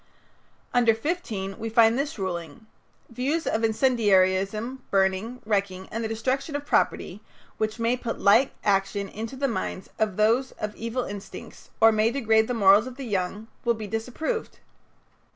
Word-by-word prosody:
Under 235 -2 +4
15 225 - -3
we 225 0 -3
find 225 0 +5
this 285 +2 -2
ruling: 175 -1 -5 0.5
"Views 275 +8 -1
of 220 - 0
incendiarism, 215 0 +2
burning, 195 +5 0
wrecking, 195 -3 -1
and 230 +1 -3
the - - -1
destruction 260 +7 -2
of 290 0 -3
property, - - 0 0.4
which 215 +1 -1
may 230 +1 +1
put 235 -2 -5
like 230 +7 +5
action 200 0 +1
into 225 +6 -6
the 275 +1 0
minds 225 -5 -4
of 215 -4 0
those 230 +5 +2
of 210 0 -5
evil 230 +2 -3
instincts, 200 -2 -9
or 225 0 +7
may 215 +1 +2
degrade 225 -4 +2
the 245 - -2
morals 205 +1 +5
of 255 0 -9
the 275 - -6
young, 200 0 -2 0.2
will 235 -2 +2
be 220 -1 -6
disapproved." 250 - -3
225 Hz, 155 wpm, -26 LUFS, 200-245 Hz, 0.5 s, or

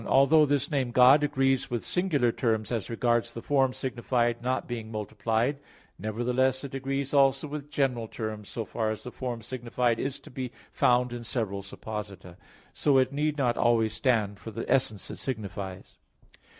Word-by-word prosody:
1: - - -8
Although 145 +3 +6
this 140 0 0
name 135 -4 +1
"God" 130 +4 +6
agrees 135 -2 +1
with 120 -2 -2
singular 155 -10 +1
terms 110 -3 -1
as 115 -5 -2
regards 120 0 +1
the 115 - -6
form 135 -2 +3
signified 120 -2 -1
not 130 +2 -1
being 115 -2 -5
multiplied; 110 +5 -1 0.4
nevertheless 125 +4 0
it 140 - -7
agrees 135 +1 -2
also 135 0 +4
with 145 0 -6
general 130 -5 0
terms 110 -2 -5
so 115 - -4
far 110 0 -2
as 110 - -4
the 125 - -7
form 120 -3 -5
signified 120 -1 -1
is 135 -1 -3
to - - -14
be 125 -1 -4 0.2
found 125 0 +2
in 120 -1 -6
several 110 -5 -2
supposita. 100 -3 -7 0.4
So 145 -2 +3
it 130 +1 +3
need 150 +1 0
not 125 -4 +1
always 115 -2 +3
stand 110 -5 +1
for 90 - -8
the 115 +1 -5
essence 110 -6 +1
it - - -7
signifies. 100 -6 -5
120 Hz, 175 wpm, -28 LUFS, 110-135 Hz, 0.4 s, Although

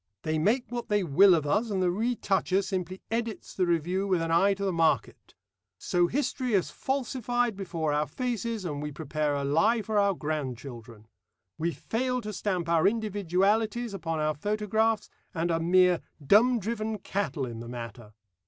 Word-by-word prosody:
They 155 0 0
make 225 +10 +2
what 240 -1 -4
they 205 -1 +2
will 180 +4 +6
of 155 -3 -1
us, 210 +10 +1
and 195 -2 -1
the 180 -1 +2
retoucher 195 -3 0
simply 185 -1 -4
edits 230 -1 -3
the 185 -2 0
review 175 +4 0
with 185 -3 +2
an 165 0 -2
eye 195 +4 +4
to 200 0 -3
the 190 - 0
market. 165 -1 0 0.4
So 175 -1 +1
history 255 -1 -1
is 185 - +1
falsified 245 -3 -1
before 170 -6 -2
our 150 0 +1
faces, 230 -4 -3
and 145 -4 -3
we 150 0 -4
prepare 150 -1 -2
a 140 - -2
lie 210 +11 +2
for 210 +1 +1
our 200 -1 +3
grandchildren. 125 -7 -5 0.5
We 165 +2 +1
fail 250 +7 -2
to 210 -1 -6
stamp 185 -3 -2
our 165 0 +4
individualities 210 +2 0
upon 165 -4 -3
our 155 0 +1
photographs, 215 +5 0 0.3
and 170 +1 0
are 165 - +1
mere 180 +1 +4 0.2
'dumb 235 - +5
driven 220 0 -3
cattle' 165 -9 -2
in 115 -2 -7
the 115 0 -8
matter. 115 -2 -8
190 Hz, 170 wpm, -28 LUFS, 160-220 Hz, 0.5 s, will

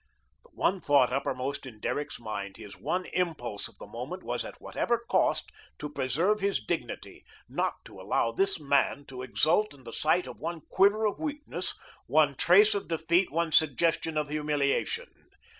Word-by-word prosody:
The 485 - -21
one 190 -1 +1
thought 140 -5 +4
uppermost 135 0 -2
in 110 -4 -11
Derrick's 145 +6 -3
mind, 100 -4 -5
his 105 -3 -10
one 180 0 -2
impulse 120 - -1
of - - -18
the - - -9
moment 125 - -6
was, - - -2
at - - -9
whatever 235 - 0
cost, 235 0 +1 0.3
to 150 - -5
preserve 165 - +1
his 200 0 +1
dignity, 110 - -4 0.2
not - - -1
to - - -11
allow 115 - +1
this 195 +8 +2
man 140 -1 +1
to 130 -1 -7
exult 160 +8 +2
in 135 - -18
the 115 - -9
sight 165 +4 +2
of - - -9
one 165 +1 -4
quiver 205 +3 +4
of 210 - 0
weakness, 300 -1 -4 0.3
one - - +4
trace 420 +1 +6
of 405 - -3
defeat, 170 +3 +2
one 165 +1 0
suggestion 160 +1 +2
of 150 -1 0
humiliation. 150 - 0
155 Hz, 170 wpm, -29 LUFS, 130-190 Hz, 0.3 s, trace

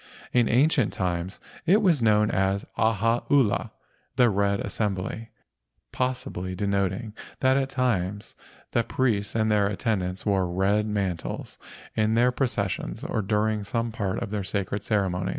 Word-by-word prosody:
In 120 -2 +3
ancient 135 -1 +3
times 90 0 -2 0.3
it 205 +6 +5
was 170 -9 +3
known 105 -1 +3
as 95 +2 0
Ahaula 115 +3 +2 0.5
(the 120 -3 +4
red 100 0 +1
assembly), 100 +2 -3 0.6
possibly 125 -8 -3
denoting 100 +2 -1 0.3
that 130 0 +4
at 135 -1 +1
times 105 -7 -1 0.4
the 120 - +2
priests 110 -5 0
and 110 -1 +2
their 105 -1 +3
attendants 95 -2 -2
wore 95 -4 +1
red 100 +4 +1
man¬ 100 -4 -1
tles - - -7 0.4
in 110 0 +2
their 120 +2 +4
processions 100 - -2
or 110 - -1
during 105 +1 0
some 115 +3 -2
part 100 -4 -2
of - - -6
their 105 -2 -2
sacred 100 +1 -2
ceremonies. 95 -4 0
105 Hz, 140 wpm, -26 LUFS, 95-115 Hz, 0.6 s, it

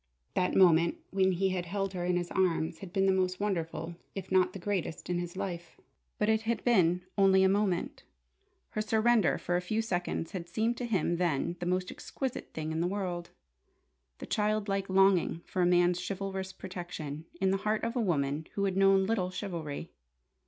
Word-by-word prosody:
That 180 - +1
moment 170 -3 +5
when 190 -1 +3
he 190 +2 +1
had 180 -2 -2
held 195 +1 -2
her 180 -1 -3
in 180 0 +1
his 175 0 -3
arms 170 -3 +1
had 190 -3 -9
been 195 +1 +2
the 195 - +4
most 185 -1 0
wonderful 170 -4 -2 0.2
if 190 -1 -6
not 185 -1 +3
the - - -5
greatest 185 -3 -3
in 175 - 0
his 175 +1 -5
life. 175 -4 -5 0.4
But 210 - +1
it 220 0 +3
had 230 +1 -2
been 180 -7 +3 0.2
only 190 -1 +6
a - - +6
moment. 195 -2 0 0.7
Her 215 - -1
surrender 220 +1 +3
for 175 - -1
a - - -1
few 215 +5 -1
seconds 175 -6 -2
had 170 -3 -6
seemed 225 +6 0
to 245 - -3
him 175 -5 +1
then 170 -1 0
the 175 - -3
most 185 0 0
exquisite 265 -3 -5
thing 155 0 -4
in 160 +1 -1
the 175 - +1
world: 180 -3 -3 0.9
the - - -7
childlike 210 -2 0
longing 190 -3 +3
for 185 - -2
a 175 - +4
man's 175 0 +3
chivalrous 190 0 -4
protection, 170 -5 -7
in 190 0 +2
the 195 - +2
heart 215 +2 -1
of 230 +2 -2
a 245 - +1
woman 150 -5 0
who 200 - 0
had 190 -2 0
known 195 0 +5
little 190 -4 0
chivalry! 170 -5 -5
185 Hz, 195 wpm, -30 LUFS, 175-195 Hz, 0.9 s, only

